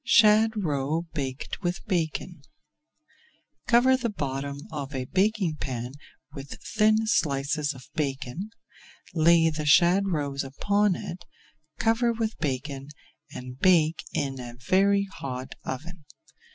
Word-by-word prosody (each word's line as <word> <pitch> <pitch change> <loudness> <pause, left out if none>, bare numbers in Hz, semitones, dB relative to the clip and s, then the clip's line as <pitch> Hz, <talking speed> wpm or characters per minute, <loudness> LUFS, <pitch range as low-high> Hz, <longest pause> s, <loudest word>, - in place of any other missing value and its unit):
SHAD 220 -1 +5
ROE 155 -4 -1
BAKED 135 0 -4
WITH 175 0 -2
BACON 170 -3 -2 1.3
Cover 255 +2 +5
the 245 -2 -1
bottom 140 -5 -4
of 145 -2 -5
a 130 -1 -2
baking 190 -1 +1
pan 125 -3 -4 0.4
with 140 -2 -8 0.2
thin 215 +1 +4
slices 145 -5 0
of 130 - -12
bacon, 145 +6 -3 0.6
lay 165 0 +5
the 155 -1 -3
shad 180 +6 +5
roes 145 -6 -1
upon 200 +8 +1
it, 175 +1 -7 0.5
cover 225 +1 +2
with 225 -1 -2
bacon, 140 -1 -3 0.4
and 125 -1 -8
bake 165 -3 +4
in 135 -2 -2
a 120 -1 -7
very 200 +1 +4
hot 135 -9 -6
oven. 155 +5 -6
160 Hz, 120 wpm, -27 LUFS, 140-200 Hz, 1.3 s, SHAD